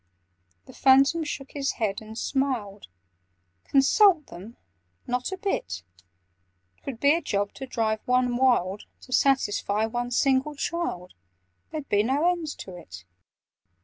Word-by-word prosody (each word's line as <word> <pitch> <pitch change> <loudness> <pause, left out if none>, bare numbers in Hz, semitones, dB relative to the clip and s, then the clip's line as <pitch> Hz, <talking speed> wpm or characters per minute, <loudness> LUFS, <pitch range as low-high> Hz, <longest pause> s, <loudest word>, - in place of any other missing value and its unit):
The - - -14
Phantom 275 +5 +4
shook 275 -3 -6
his 275 -2 -2
head 210 -3 -2
and 220 0 -10
smiled. 240 -9 -2 0.8
"Consult 315 +4 +4
them? 195 +7 -11 0.5
Not 250 +6 -2
a 380 - -4
bit! 95 - -3 1.0
'Twould 255 -5 -7
be 285 +2 +5
a 335 - 0
job 205 -8 -2
to 265 - -8
drive 220 -3 -1
one 250 -1 +2
wild, 240 -7 +1 0.2
To 255 - -9
satisfy 220 -5 +2
one 240 +2 -3
single 270 +3 +1
child— 280 - -3 0.6
There'd 305 -3 -6
be 205 - +3
no 270 +9 +1
end 345 -3 -4
to 185 - -9
it!" 95 - -11
255 Hz, 135 wpm, -26 LUFS, 210-280 Hz, 1.0 s, be